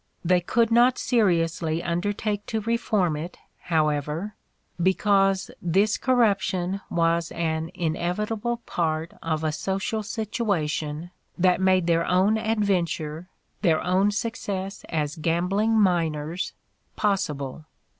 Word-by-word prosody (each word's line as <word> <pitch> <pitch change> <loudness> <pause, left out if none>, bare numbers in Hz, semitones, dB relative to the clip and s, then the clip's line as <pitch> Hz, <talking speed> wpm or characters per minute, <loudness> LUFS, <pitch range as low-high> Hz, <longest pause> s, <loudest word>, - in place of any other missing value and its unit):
They 180 +1 +4
could 230 +6 +1
not 240 +2 +5
seriously 170 -7 +1
undertake 205 +4 -2
to 220 -1 -1
reform 210 -6 +1
it, 165 +4 -6 0.3
however, 155 +3 0 0.5
because 195 +1 +2
this 195 +5 +2
corrup 235 -6 +3
tion 190 +1 -2
was 165 0 +1
an 160 -1 -1
inevitable 210 +8 -2
part 160 -1 -1
of 160 -1 -2
a 155 - +1
social 195 +7 -2
situation 175 -8 -2 0.3
that 180 +1 +3
made 185 -2 +3
their 170 -1 +2
own 195 +5 +3
adventure, 180 -7 -1 0.3
their 160 -2 +3
own 185 +3 +3
success 200 -3 -3
as 150 -1 -2
gam 170 +2 0
bling 215 +4 +2
miners, 165 -3 0 0.4
possible. 155 -8 -1
180 Hz, 115 wpm, -25 LUFS, 165-210 Hz, 0.5 s, not